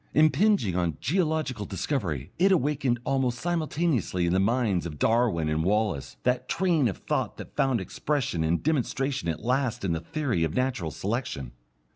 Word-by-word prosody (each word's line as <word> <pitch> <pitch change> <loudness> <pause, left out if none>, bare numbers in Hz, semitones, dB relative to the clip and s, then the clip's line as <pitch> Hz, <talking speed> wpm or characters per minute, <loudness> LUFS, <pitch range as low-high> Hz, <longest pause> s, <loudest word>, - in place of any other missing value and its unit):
Impinging 155 - +4
on 85 -5 0
geological 155 - 0
discovery, 95 - -3
it 195 +2 +5
awakened 140 -7 +1
almost 130 -3 0
simultaneously 155 - 0
in 85 - +1
the 95 - +3
minds 100 -4 +1
of 75 -3 -8
Darwin 110 - +2
and 75 +1 0
Wallace, 105 -5 0
that 125 0 0
train 170 -8 +2
of 95 - -3
thought - - -2
that - - -10
found 135 -4 +2
expression 115 - -1
and 80 +2 0
demonstration 135 - 0
at 80 - -4
last 125 -3 0
in 90 - 0
the 80 - 0
theory 120 - -1
of 80 -1 -1
natural 125 -10 0
selection. 95 - -3
120 Hz, 160 wpm, -27 LUFS, 90-145 Hz, -, it